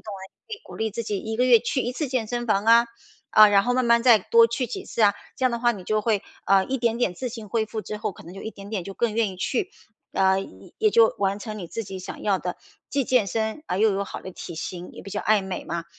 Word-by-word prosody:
啊， 200 -3 -8 0.2
可 445 - -5
以 - - -17
鼓 - - -11
励 220 0 -1
自 230 +3 -4
己 205 -2 -3
1 220 +2 -4
个 250 - +3
月 245 -2 +7
去 255 +2 -1
1 245 - -2
次 290 +1 -3
健 250 -4 -1
身 240 +1 -3
房 205 -1 +1
啊。 235 +1 +6 0.4
啊， 215 0 +8
然 200 -1 +4
后 245 +1 0
慢 255 -1 +2
慢 235 0 +4
再 240 -4 +7
多 230 +4 +5
去 240 +2 -2
几 240 - -6
次 225 - -1
啊。 200 -1 +6 0.2
这 260 - -2
样 255 - +4
的 235 - -1
话 240 - +4
你 190 -4 -9
就 215 +2 +1
会， 210 -2 0 0.2
呃， 195 0 +4
一 265 0 -2
点 230 -1 +1
点 235 -7 0
自 250 +8 -4
行 225 -3 -8
恢 225 -2 +1
复 220 0 -5
之 210 - -5
后 210 - -2
可 - - -14
能 170 - -10
就 195 - -8
一 220 - -5
点 200 -1 -11
点 210 -5 -2
就 195 +3 -7
更 225 0 0
愿 225 -3 +1
意 185 - -10
去。 370 - -1 0.4
呃， 190 0 +3
也 95 - -12
也 430 -1 +3
就 225 - +5
完 200 0 0
成 215 0 -6
你 175 - -6
自 225 - -5
己 190 -1 -7
想 185 - -8
要 200 -2 +1
的， 180 0 -4 0.3
既 275 -2 0
健 250 -5 +2
身 220 - -2
而 180 - -2
又 215 -1 +4
有 195 +1 -1
好 - - -7
的 190 - -7
体 170 - -8
型， 175 +2 -6
也 - - -10
比 200 - -9
较 205 - -2
爱 210 -2 +3
美 190 -1 -5
嘛。 170 -1 -3
215 Hz, 310 characters per minute, -24 LUFS, 195-235 Hz, 0.4 s, 啊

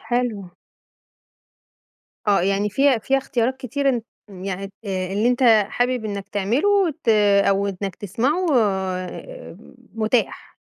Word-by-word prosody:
حلو. 225 -5 -2 1.8
آه 200 -3 +4
يعني 200 +2 0
في 270 +1 +3
فيها 270 +4 +1
اختيارات 260 -1 -1
كتيرة 275 +2 -2
أن 240 -3 -2 0.4
يعني 195 0 -5
آآ 190 -1 -3
اللي 215 +4 +1
أنت 250 +1 0 0.3
حابب 245 -2 -1
إنّك 200 -1 -5
تعمله 300 - +1
ت - - -4 0.4
أو 200 0 +2
إنّك 195 -1 -4
تسمعه 260 - -1
آآ 190 - -3 0.4
متاح. 225 +2 -1
220 Hz, 120 wpm, -22 LUFS, 195-255 Hz, 1.8 s, آه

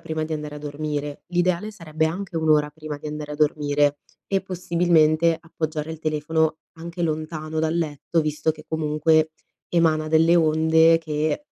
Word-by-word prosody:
prima 160 0 -3
di 160 0 -3
andare 150 -1 -6
a - - -7
dormire. 145 0 -4
L'ideale 180 +3 0
sarebbe 160 -6 -2
anche 175 +2 -3
un'ora 155 -2 +3
prima 150 -1 -7
di - - -8
andare 150 0 -5
a - - -5
dormire 145 -1 +1 0.3
e 195 - +3
possibilmente 170 -3 +2
appoggiare 160 -1 -4
il 160 - -6
telefono 155 +1 0 0.2
anche 170 +1 -6
lontano 155 0 -3
dal 160 0 0
letto, 160 0 -1
visto 155 +1 0
che 155 0 -8
comunque 155 0 +2 0.4
emana 160 -2 +2
delle 165 +2 +4
onde 160 0 +4
che 155 - -2
155 Hz, 155 wpm, -23 LUFS, 150-165 Hz, 0.4 s, delle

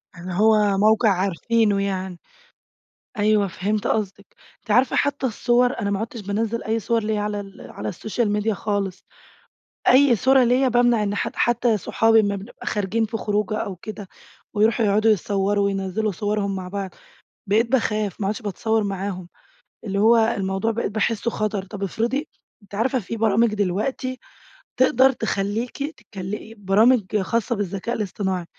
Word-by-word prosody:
يعني 180 +2 -7
هو 210 -2 +4
موقع 215 +2 +4
عارفينه 200 +3 +1
يعني، 190 -2 -3 1.0
أيوه 210 -1 +3
فهمت 200 +4 -2
قصدِك، 200 -2 -2 0.4
أنتِ 215 - -5
عارفة 250 +4 +3
حتى 285 -1 0
الصور 245 +2 +1
أنا 200 -2 -1
ما 200 - -1
عُدتش 225 0 -5
بانَزّل 215 +3 -2
أي 225 +1 0
صور 230 +1 0
ليَّ 215 0 -1
على 210 0 -2
ال 195 -1 -10
على 105 +1 -5
السوشيال 220 - -2
ميديا 210 +1 0
خالص، 200 -2 -3 0.8
أيّ 260 -1 +6
صورة 260 +3 +4
ليَّ 255 +2 +3
بامنع 240 -2 +3
إن 205 0 -1
حد - - -3
حتى 240 -1 +2
صُحابي 225 +3 +3
أما 200 -2 +1
بنبقى 200 +4 -10
خارجين 210 +2 0
في 225 +1 -4
خروجة 210 0 -1
أو 195 - -4
كده 205 +2 -8 0.5
ويروحوا 225 +2 +2
يقعدوا 215 +2 +3
يتصوروا 200 0 +1
وينزّلوا 195 +2 -1
صورهم 205 +1 -2
مع 185 -1 -5
بعض، 195 0 -4 0.6
بقيت 225 +4 +1
باخاف، 215 -6 0
ما 195 - -1
عُدتش 215 +4 -3
باتصور 220 +2 -1
معاهم، 195 -2 -4 0.6
اللي 200 -1 -2
هو 225 +3 +5
الموضوع 205 -2 +1
بقيت 225 -2 -2
باحسه 225 +1 0
خطر، 210 -3 -2
طب 200 0 -9
افرضي 240 - -1 0.3
أنتِ 200 - -15
عارفة 245 +5 +1
في 230 +2 -5
برامج 225 0 +2
دلوقتي 215 +7 -2 0.6
تقدر 260 +1 +5
تخلّيكِ 225 +2 -2
تتكلِ 210 +2 -7
برامج 210 +2 +3
خاصة 230 +4 -1
بالذكاء 200 +3 -3
الاصطناعي، 190 -4 -2
210 Hz, 155 wpm, -22 LUFS, 200-230 Hz, 1.0 s, أيّ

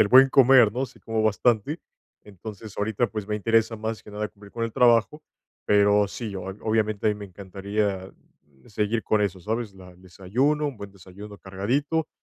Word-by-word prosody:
del 105 - +4
buen 135 +2 +7
comer, 130 -5 +6
¿no?, 130 +3 -2
sí 125 - -19
como 115 -1 -2
bastante. 110 - +1 0.4
Entonces, 105 +1 -10
ahorita, 110 +3 0
pues, 105 0 -6
me 105 - -1
interesa, 115 +1 +1
más 110 +1 -4
que - - -13
nada, 105 0 -4
cumplir 100 0 -16
con 115 - -2
el 115 - -4
trabajo, 120 +6 +3 0.4
pero, 105 0 +4
sí, 110 -2 -6
ob 95 +1 -6
obviamente, 110 -2 0
a - - +5
mí - - -1
me 105 0 -8
encantaría, 100 0 -3 0.5
mm, - - -18
seguir 105 +2 -1
con 110 - +1
eso, 100 -2 -1
¿sabes? 110 +1 -3
La 90 -1 -13
el 90 - -20
desayuno, 120 +12 -1
un 135 -7 -5
buen 100 -1 -8
desayuno 100 +2 -12
cargadito, 130 +13 -2
105 Hz, 190 wpm, -25 LUFS, 100-115 Hz, 0.5 s, buen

